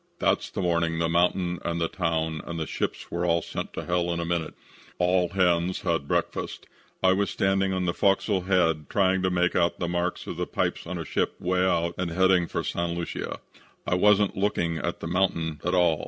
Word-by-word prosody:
That's - - +1
the 95 - -3
morning 85 -1 +1
the 85 0 +1
mountain 90 +1 +1
and 85 0 -2
the 85 - +1
town 80 -2 -1
and 85 -1 -4
the 80 - -1
ships - - -4
were 85 0 -2
all 85 -1 +2
sent - - -5
to - - -5
hell 90 -1 0
in 85 - -2
a 85 - -2
minute. 85 -2 -2 0.4
"All 90 0 +2
hands 90 -1 +1
had 90 - 0
had 75 -4 -1
breakfast. - - -2 0.4
I 95 0 +6
was 100 +1 0
standing 95 0 +1
on 95 -1 -1
the 85 - 0
fo'c's'l 95 -1 +1
head 80 -6 +2
trying 95 -1 +2
to 95 - +2
make 90 -1 +1
out 85 0 +2
the 85 - -2
marks 85 +1 -2
on - - -5
the - - -2
pipes - - -2
of 90 +1 -4
a 85 - -5
ship - - -1
'way 90 0 +1
out 85 -2 +1
and 90 -2 -1
heading 90 0 +3
for - - -3
St. 85 0 -2
Lucia. 85 - -4 0.4
I - - 0
wasn't 105 +2 +4
looking 85 -5 0
at 85 - -3
the - - -4
mountain 85 -4 0
at 90 +1 +1
all. 85 -4 +3
85 Hz, 215 wpm, -26 LUFS, 85-95 Hz, 0.4 s, I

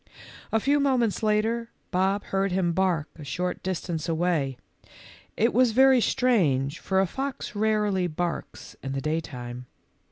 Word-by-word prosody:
A 225 - +3
few 285 +5 +2
moments 255 -6 +1
later, 220 +2 +1 0.2
Bob 195 +2 +1
heard 195 0 -1
him 180 -2 +1
bark 175 -4 +1
a - - -7
short 180 +7 -3
distance 175 -3 -3
away. 160 -6 0 0.8
It 230 - +4
w - - +2
r - - +8
as 250 -3 +4
very 265 +1 +6
strange, 160 - +2
for 190 -1 0
a 190 - +4
fox 270 +7 -4
rarely 210 -3 +1
barks 175 +1 -4
in 135 0 -4
the 135 - -2
daytime. 125 -5 -4
190 Hz, 155 wpm, -26 LUFS, 160-225 Hz, 0.8 s, r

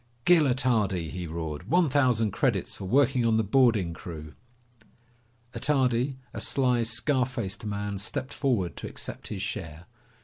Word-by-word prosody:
"Gil 175 -3 +6
Attardi!" 110 -10 +1
he 90 -2 -5
roared. 80 +2 -5
"One 175 +2 +4
thousand 125 -6 +2
credits - - 0
for - - -7
working 130 +3 +3
on 115 -1 +3
the 110 - +2
boarding 110 -6 +3
crew." 80 -3 -8 1.2
Attardi, 130 -2 +1 0.2
a - - -4
sly, 125 -3 +1
scar 120 +3 +1
faced 110 -5 -5
man, 100 -1 -3
stepped 130 +6 -4
forward 115 - 0
to - - -5
accept - - -6
his 100 -2 -4
share. 85 -5 -5
115 Hz, 145 wpm, -27 LUFS, 95-130 Hz, 1.2 s, Gil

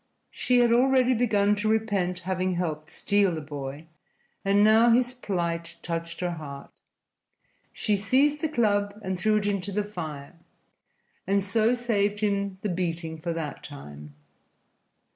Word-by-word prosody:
She 250 -1 +2
had 240 -1 +4
already 255 +1 +4
begun 210 -4 +2
to 215 +1 0
repent 200 -5 0
having 185 0 -1
helped 155 -3 -3
steal 200 -4 +1
the - - -3
boy, 145 0 -7 0.6
and 200 +1 +4
now 220 +2 +6
his 245 +1 +3
plight 170 -8 -3
touched 170 0 -4
her 180 -1 0
heart. 145 -4 -8 1.0
She 210 - 0
seized 275 +9 +2
the 315 - 0
club 205 -6 +1
and 190 0 -2
threw 215 +2 +3
it 205 - -1
into 200 -1 -1
the 210 +2 0
fire, 155 -8 -7 0.9
and 195 0 +1
so 220 +5 +2
saved 210 -4 0
him 200 -2 0
the 210 - 0
beating 165 -2 -3
for 170 +2 -3
that 160 -3 -5
time. 75 - -11
200 Hz, 145 wpm, -26 LUFS, 170-215 Hz, 1.0 s, now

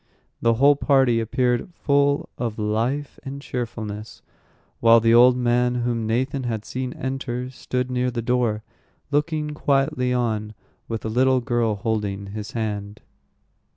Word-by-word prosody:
The 115 0 +3
whole 140 +4 +5
party 135 -5 +3
appeared 120 - 0
full 140 0 +2
of 115 -3 -3
life 115 +7 -1
and 140 0 -7
cheerfulness, 110 -5 -6 0.6
while 115 0 +7
the 115 0 +3
old 125 +1 +7
man 125 0 +2
whom 120 -2 -1
Nathan 130 +4 0
had 110 -3 -3
seen 130 0 -4
enter 130 -1 -4
stood 125 -1 -3
near 125 0 0
the 120 -2 -3
door, 115 -3 0 0.5
looking 150 +1 0
quietly 135 -3 +1
on, 110 -3 -1 0.3
with 115 -1 -4
a - - 0
little 130 +3 +3
girl 120 -3 0
holding 100 -2 -3
his 105 0 -6
hand. 105 -2 -4
120 Hz, 140 wpm, -23 LUFS, 110-130 Hz, 0.6 s, while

